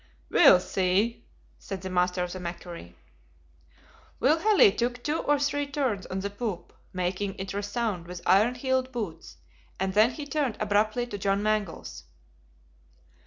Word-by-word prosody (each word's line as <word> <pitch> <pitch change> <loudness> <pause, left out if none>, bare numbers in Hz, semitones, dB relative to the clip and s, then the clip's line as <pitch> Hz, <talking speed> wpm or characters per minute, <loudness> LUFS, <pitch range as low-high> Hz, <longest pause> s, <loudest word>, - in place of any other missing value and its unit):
"We'll 275 - +7
see," 190 +5 0 0.3
said 195 -2 -6
the 190 - -4
master 180 0 +1
of 180 - -5
the 185 - -6
MACQUARIE. 170 - -8 1.2
Will 305 +5 +3
Halley 415 - +6
took 240 +3 -2
two 300 +2 0
or 295 0 +2
three 290 0 -1
turns 265 -9 -2
on 190 +1 -3
the 200 +1 -4
poop, 205 -3 -5 0.2
making 185 +2 -2
it 190 0 -5
resound 205 -3 -2
with 180 0 -8
iron 215 +6 +4
heeled 260 0 -1
boots, 200 -10 -6 0.4
and 190 0 -1
then 215 +3 +5
he 285 +4 -7
turned 285 -4 -1
abruptly 215 +3 +1
to 205 -4 -7
John 195 +1 0
Mangles. 215 -4 -2
205 Hz, 150 wpm, -27 LUFS, 185-250 Hz, 1.2 s, We'll